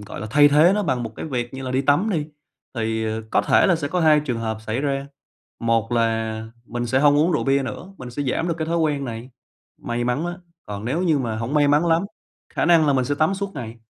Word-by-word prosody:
gọi 105 0 -8
là, 110 - -5
thay 145 +2 +6
thế 155 +6 +5
nó 210 - 0
bằng 130 -8 -1
một 115 -1 -5
cái - - -5
việc 125 -4 -3
như 135 - -6
là 130 - -4
đi 130 +1 +1
tắm 160 +11 +2
đi, 150 -3 -1 0.5
thì, 110 -1 -1
ờ, 110 0 -3
có - - +3
thể - - +4
là 175 - +3
sẽ 150 -3 -3
có 180 +4 -1
2 155 -2 +5
trường 125 -6 -3
hợp 110 -1 -3
xảy 115 +5 -1
ra, 140 -1 -2 0.5
một 115 0 0
là 110 -1 -1 0.2
mình 120 0 -4
sẽ 130 +3 +1
hông 145 0 +5
uống 160 +4 +3
rượu - - 0
bia 135 0 +2
nữa, 175 +8 -7
mình 125 -1 -8
sẽ 145 +4 -4
giảm 150 +6 -1
được 170 - 0
cái 160 - -2
thói 170 +1 0
quen 150 -4 0
này. 120 +1 -7 0.5
May 120 0 -3
mắn 125 +7 -1
á, 175 +1 -5 0.3
còn 105 +1 -6
nếu 150 +9 -1
như 160 -5 +2
mà 115 -4 -2
hổng 115 +6 -3
may 145 -1 +4
mắn 150 +4 +3
lắm, 165 +1 +3 0.5
khả - - +1
năng 165 -3 +5
là 145 - +4
mình 130 -2 +1
sẽ 145 +3 -1
tắm 155 +6 +1
suốt 200 0 -4
ngày. 120 -4 -7
135 Hz, 270 wpm, -22 LUFS, 115-155 Hz, 0.5 s, thay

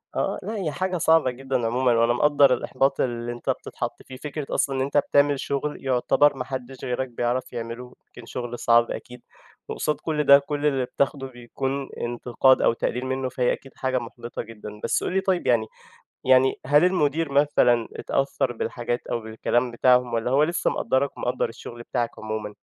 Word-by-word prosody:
آه، - - -1
لأ 215 +4 -4
هي 185 -8 -2
حاجة 185 +3 -2
صعبة 160 -5 +3
جدًا 130 -1 -2
عمومًا 125 +2 +2
وأنا 115 +1 +3
مقدّر 140 0 +4
الإحباط 135 +2 0
اللي 120 -1 -2
أنت 120 - -6
بتتحط - - -4
فيه. 130 - -11
فكرة 150 +2 -5
أصلًا 135 - +1
إن 130 - 0
أنت 140 +2 0
بتعمل 145 0 +3
شُغل 140 +1 -3
يُعتبر 135 +3 +3
ما 125 - -2
حدّش 130 -1 -6
غيرك 130 +1 -2
بيعرف 120 +2 -2
يعمله، 120 +1 -6
يمكن 120 - -13
شُغل 120 0 -6
صعب 115 0 +4
أكيد 125 0 -8 0.5
وقصاد 150 - -1
كل 150 -2 -1
ده، 140 0 +8
كل 145 +1 -4
اللي 135 -3 +2
بتاخده 135 +1 -1
بيكون 130 +2 -4
انتقاد 120 +2 +2
أو - - +4
تقليل 125 +2 -2
منّه، 130 0 -2
فهي 125 0 +1
أكيد 135 - -9
حاجة 130 -1 -1
مُحبِطة 120 0 -7
جدًا. 105 -2 -10
بس - - 0
قُل - - -2
لي 190 - +2
طيب 190 -2 0
يعني 115 -3 +3 0.6
يعني 130 0 +4
هل 145 +5 +5
المدير 160 -4 +1
مثلًا 130 -5 +3
اتأثّر 135 -2 -1
بالحاجات 120 +1 -3
أو 120 - -1
بالكلام 115 +2 -1
بتاعهم 125 0 +3
والّا 115 +2 -1
هو 140 +3 +4
لسّه 170 +2 +1
مقدّرك 135 +1 0
ومقدّر 125 - -1
الشُغل 120 +1 -10
بتاعك 120 -1 -1
عمومًا؟ 110 -1 -5
130 Hz, 180 wpm, -24 LUFS, 120-140 Hz, 0.6 s, ده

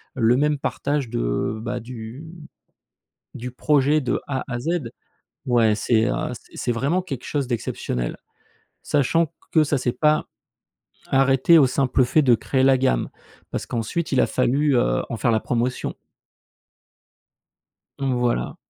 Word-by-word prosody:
le 115 -1 +3
même 150 +1 +2
partage 140 -2 -2
de, - - -1
bah, 120 +2 -3
du 120 +4 -9 1.1
du 125 +2 -6
projet 145 +3 +2
de 130 - -1
A 135 -2 -2
à 120 - -2
Z, 170 +5 -1 0.6
ouais 115 -3 +3
c'est, 110 +1 +2
heu, - - +1 0.2
c'est - - -13
c'est - - -1
vraiment 140 +10 0
quelque 135 -9 -6
chose 145 -3 -1
d'exceptionnel. 60 - -3 0.7
Sachant 155 +4 +2
q - - -35 0.2
que 160 - +5
ça 145 -1 0
s'est 125 -1 0
pas 150 +4 +2 0.8
arrêté 135 +4 +4
au 140 - +6
simple 130 -1 +2
fait 155 +5 +3
de 125 -4 +5
créer 130 +3 0
la 135 0 +5
gamme 125 - +1 0.4
parce - - -3
qu'ensuite 120 +9 -3
il 130 - +3
a - - +4
fallu, 140 +3 +1
heu, 120 - +1
en 115 - -2
faire 120 - +1
la 110 - +3
promotion. 125 +1 -2 2.0
Mmh 135 -2 0
voilà. 120 -1 -1
130 Hz, 150 wpm, -23 LUFS, 120-145 Hz, 2.0 s, au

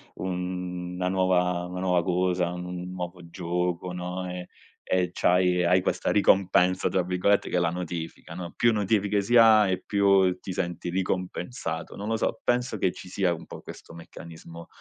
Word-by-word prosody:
una 90 0 -4
nuova 90 -1 +1
una 90 0 -5
nuova 90 -2 +2
cosa, 90 -1 0
un 90 0 -6
nuovo 90 -1 -7
gioco, 90 +1 -2
no, 90 +1 -4
ehm, 90 0 -6 0.4
e 90 -1 +1
c'hai 90 0 +3
e 90 - +2
hai 90 +1 +4
questa - - -1
"ricompensa", 95 -2 +3
tra 95 -1 +1
virgolette, 90 +3 +1
che - - 0
è - - +3
la 85 -1 +2
notifica, 85 -1 -6
no, 85 0 -7
più 120 -1 +3
notifiche 105 -1 +1
si 120 +5 +3
ha 110 -3 +7
e 95 - 0
più 100 -3 +3
ti 95 - -7
senti 85 -1 -3
ricompensato. 90 -1 -3
Non 105 - -6
lo 110 0 0
so, 115 - -1
penso 120 -2 0
che 90 - +2
ci - - -11
sia 95 -1 +1
un 80 - -11
po' - - -10
questo - - -11
meccanismo, 85 0 -11
90 Hz, 175 wpm, -26 LUFS, 90-95 Hz, 0.4 s, ha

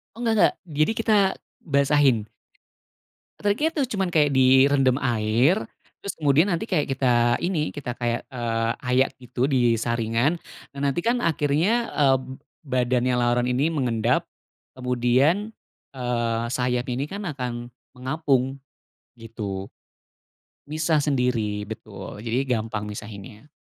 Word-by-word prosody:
Oh, - - -12
enggak 225 - +3
enggak. 175 - +5
Jadi 155 +2 +1
kita 220 -1 +3 0.4
basahin. 140 -6 +2 1.1
Triknya 210 +10 +1
tu 315 - -1
cuman 190 -2 0
kayak 150 -3 +4
direndam 130 0 +5
air, 115 - +3 0.5
terus 200 - -2
kemudian 150 +4 +4
nanti 170 +6 -2
kayak 165 -9 0
kita 135 0 0 0.4
ini, 165 -5 -1
kita 125 -4 -5
kayak, 120 -1 -2
eee, 115 -1 -1 0.2
ayak 130 +2 +3
gitu 125 +1 -1
di 120 -5 +2
saringan. 120 +5 0 0.4
Nah, - - -6
nanti 140 +2 +1
kan 235 +6 0
akhirnya, 165 +9 +1
eee, 135 -2 +4 0.5
badannya 125 -1 +1
laron 120 0 +1
ini 135 +6 +1
mengendap, 125 -5 0 0.5
kemudian, 130 - +1 0.4
eee, 120 -2 -1
sayap 125 -2 0
ini 130 +4 -2
kan 200 +5 -6
akan 125 -3 -5 0.2
mengapung, 135 0 0 0.6
gitu. 105 -4 -5 1.0
Misah 155 +2 0
sendiri 125 -8 0
betul, 110 -3 -8
jadi 125 +4 -1
gampang 110 -1 -4
misahinnya. 105 +4 -9
130 Hz, 120 wpm, -24 LUFS, 120-150 Hz, 1.1 s, enggak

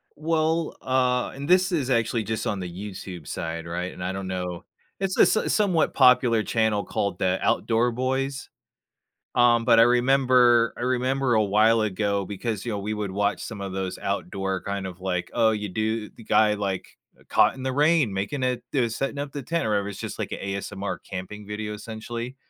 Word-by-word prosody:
Well, 160 +1 0
ah 125 -1 +1
and 140 +1 -7
this 185 +1 +4
is 145 -7 0
actually 115 -2 +1
just 110 +1 -3
on 100 - -1
the 90 -1 -5
YouTube 95 -3 -8
side, 85 0 -4
right? 90 +2 -4
And 90 - -8
I 90 - -1
don’t 95 0 -5
know 90 -2 -4 0.4
it's 195 -1 -1
a - - +6
s 215 - +2
somewhat 185 -7 +2
popular 125 -4 +5
channel 110 -3 +1
called 95 0 -2
the 95 0 +1
Outdoor 115 +1 +2
Boys. 130 +2 -2 0.9
Um, 120 -1 +4
but 115 -1 +6
I - - +9
remember 125 -1 +4
I - - -6
remember 130 +1 +1
a 110 - +4
while 110 +3 +4
ago, 100 -1 0
because, 105 +1 -4
you 115 - -2
know, 105 - -2
we 105 +2 -3
would 105 -2 -3
watch 100 +2 0
some 110 -4 -7
of 95 -1 -5
those 95 -1 -3
outdoor 95 -1 -2
kind 100 -1 -3
of 90 -1 -9
like, 90 -1 -2
oh, 115 -2 +3
you 105 -1 -3
do 110 +2 -2
the - - -15
guy, 110 -1 +3
like, 100 -2 -4 0.2
eh, - - -21
caught - - +4
in 135 - -9
the 130 0 -1
rain, 150 -4 +3
making 100 +9 -3
it 125 -1 0
the 125 -5 +2
setting 135 +5 -3
up 140 0 -4
the 145 - -5
tent, 165 +4 -1
or - - 0
whatever, 100 -1 0
it’s 100 - -7
just - - -6
like - - -4
a - - -5
ASMR 100 0 -4
camping 100 +3 -7
video 105 +1 -4
essentially. 115 +3 -6
110 Hz, 205 wpm, -25 LUFS, 100-130 Hz, 0.9 s, I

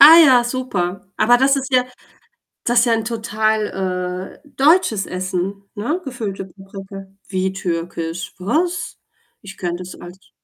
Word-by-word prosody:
Ah 315 +4 +11
ja, 250 -3 +6
super. 200 -7 -2
Aber 240 +2 +5
das 270 +2 +4
ist 270 0 -3
ja 250 -1 +5 0.8
das 240 0 +4
ist 235 - +4
ja 230 - +3
'n 225 -1 +1
total, 210 -5 -1
äh, - - -20
deutsches 275 - +4
Essen, 185 +2 -3
ne? 290 - -1
Gefüllte 215 -7 -4
Paprika. 195 +1 -10 0.2
Wie 190 -1 -1
türkisch, 170 -2 -3
was? 320 - -1 0.4
Ich 195 -1 -11
kenne 175 -1 -2
das 180 0 -9
als 180 +2 -13
200 Hz, 145 wpm, -20 LUFS, 185-245 Hz, 0.8 s, Ah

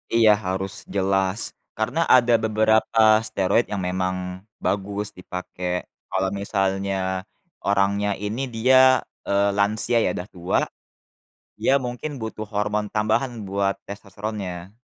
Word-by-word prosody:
Iya 110 -2 +7
harus 95 +1 -2 0.2
jelas 95 +1 +1 0.4
karena 110 +9 -1 0.2
ada 120 -1 +4
beberapa 110 +1 +2 0.3
steroid 100 +5 +2
yang 100 -2 -2
memang 95 0 -1 0.5
bagus 100 +1 -1
dipakai. 90 0 -4 0.3
Kalau 95 0 +1
misalnya 95 -1 -1 0.4
orangnya 100 +1 +2
ini 105 +5 -2
dia, 130 +2 +6 0.3
eee, 100 0 +3
lansia 105 +4 +2
ya - - +2
udah 90 - -5
tua, 90 0 +1 1.0
dia - - +2
mungkin 125 +5 -4
butuh 110 -1 -5
hormon 105 0 0
tambahan 110 +4 +1 0.2
buat 100 0 +1
testosteronnya. 100 -3 -6
100 Hz, 115 wpm, -23 LUFS, 95-110 Hz, 1.0 s, Iya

